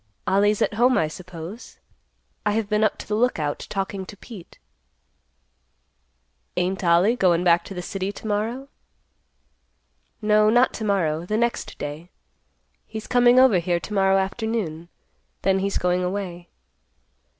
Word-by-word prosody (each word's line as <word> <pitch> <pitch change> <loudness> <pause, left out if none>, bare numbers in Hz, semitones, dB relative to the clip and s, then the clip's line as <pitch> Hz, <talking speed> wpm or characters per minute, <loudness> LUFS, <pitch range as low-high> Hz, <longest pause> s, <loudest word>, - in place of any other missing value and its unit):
"Ollie's 205 +2 +2
at - - -1
home, 245 +4 +3
I 155 - +2
suppose. 180 +5 -9 0.7
I 210 - +1
have 220 -1 -1
been 210 +1 +1
up 215 - +1
to - - -9
the 210 - -3
Lookout 190 -11 -1
talking 195 -1 -3
to 205 - -10
Pete." 205 -5 -12 2.0
"Ain't 185 +2 -1
Ollie 175 +7 +4
goin' 180 -6 +2
back 170 -1 +4
to 195 - -8
the 180 - -5
city 195 +1 -3
to - - -12
morrow?" 220 +6 -2 1.5
"No, 215 -1 +4
not 245 +3 +4
to 220 - -5
morrow; 170 -6 0
the 215 - 0
next 235 +1 -2
day. 150 +4 -6 0.8
He's 220 -1 -7
coming 245 0 +5
over 255 -8 +5
here 175 0 0
to 170 +6 -8
morrow 195 -1 +3
afternoon. 190 -4 -2 0.5
Then 190 0 +2
he's 195 +1 -1
going 180 0 +1
away." 180 -2 -4
195 Hz, 145 wpm, -23 LUFS, 180-215 Hz, 2.0 s, coming